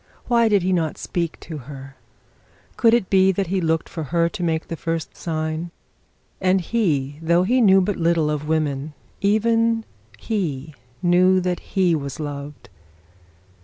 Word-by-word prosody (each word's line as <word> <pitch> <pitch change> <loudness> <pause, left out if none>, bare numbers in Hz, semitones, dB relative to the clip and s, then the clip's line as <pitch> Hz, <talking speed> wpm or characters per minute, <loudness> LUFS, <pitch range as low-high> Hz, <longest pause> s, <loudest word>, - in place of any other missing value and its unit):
Why 235 -2 +3
did 200 -4 +3
he 185 +1 +1
not 160 -4 -1
speak 170 -2 -3
to 155 -3 -7
her? 135 -1 -9 0.8
Could 230 -1 +4
it 225 -6 0
be 190 0 +5
that 195 +2 -1
he 190 +2 -1
looked 160 -1 0
for 160 -3 -5
her 170 +3 +1
to 200 +1 -7
make 160 -1 -1
the 165 - -4
first 165 -1 -4
sign? 160 0 -3 0.7
And 185 0 +3
he, 155 -9 -1
though 170 +2 +3
he 250 +7 +2
knew 195 -3 +6
little 170 -5 +1
of 150 0 -3
women, 150 -2 -1 0.3
even 225 +2 +2 0.3
he 155 - -3 0.3
knew 180 +1 +4
that 180 -1 -1 0.2
he 180 -3 +4
was 140 -3 -3
loved. 145 -1 -7
170 Hz, 155 wpm, -22 LUFS, 155-190 Hz, 0.8 s, knew